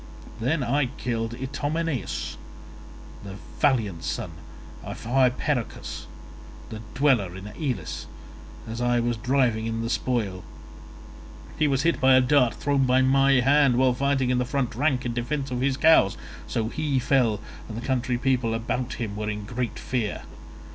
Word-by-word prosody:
I 115 - -11
then 135 -2 +1
killed 115 0 -2
Itymoneus, 145 +3 -3 0.9
the 100 -1 -8 0.2
valiant 110 - +1
son - - -3 0.5
of - - -7
Hypeirochus, 130 +1 0 0.6
a 110 - -6 0.2
dweller 125 -10 +2
in 95 +1 -8
Elis, 135 0 -4 0.6
as 115 +2 -5
I 120 0 +2
was 120 0 0
driving 120 -1 +1
in 115 0 -2
the 115 - -2
spoil; 105 -9 -1 1.2
he 155 - +4
was 135 -1 +1
hit 170 0 +1
by 130 0 +6
a - - +7
dart 125 -2 +3
thrown 140 -2 +1
by 130 +1 +4
my 135 +1 +4
hand 140 0 +4
while 130 0 +4
fighting 135 0 +1
in 125 - +2
the - - +2
front 125 -1 -1
rank 130 +1 0
in 120 - -1
defence 135 +3 -3
of 125 0 -2
his 135 0 +1
cows, 155 -12 +5 0.3
so 115 -2 -1
he 150 0 -1
fell 125 -4 +2 0.3
and 110 - -6
the 120 - -6
country 125 -2 0
people 125 -3 +1
around 120 +2 -2
him 110 -4 -4
were 105 0 -3
in 105 -1 -4
great 120 +2 -3
fear. 115 -6 -3
125 Hz, 155 wpm, -25 LUFS, 115-135 Hz, 1.2 s, a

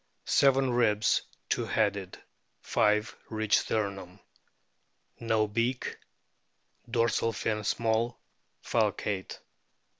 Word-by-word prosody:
Seven 135 -1 +4
ribs 115 -3 +3 0.3
two - - 0
headed; 100 -4 -1 0.5
five 105 +2 +1
reach 110 -1 +2
sternum. 100 -3 -3 1.0
No 110 -2 +1
beak. 115 +4 -1 0.9
Dorsal 115 -1 +1
fin 110 0 -2
small, 115 +2 0 0.4
falcate. 95 -3 -1
110 Hz, 80 wpm, -29 LUFS, 105-115 Hz, 1.0 s, Seven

